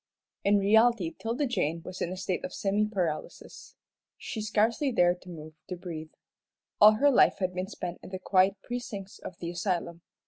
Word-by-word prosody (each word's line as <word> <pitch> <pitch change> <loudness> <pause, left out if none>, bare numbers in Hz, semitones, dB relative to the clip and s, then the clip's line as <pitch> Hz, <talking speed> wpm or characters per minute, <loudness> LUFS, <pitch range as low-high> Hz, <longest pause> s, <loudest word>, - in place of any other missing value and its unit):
In 205 +1 +4
reality 210 -2 +4
'Tilda 235 - -2
Jane 165 - -1
was 185 0 -8
in 175 - -1
a 185 - -5
state 185 -1 -2
of 185 - -5
semi 205 +2 +1
paralysis. 180 -7 -5 0.4
She 220 - -5
scarcely 220 +6 +1
dared 180 -5 +2
to 180 - -13
move, 155 -2 -9 0.2
to 180 - -3
breathe. 165 -3 -7 0.7
All 210 +1 +9
her 280 +7 +4
life 250 - +5
had 185 -2 -1
been 185 +1 -3
spent 180 -3 -6
in - - -11
the 190 - -5
quiet 190 +1 +3
precincts 235 -5 -6
of 170 - -9
the 170 -1 -5
asylum. 175 -2 -2
190 Hz, 180 wpm, -28 LUFS, 175-215 Hz, 0.7 s, All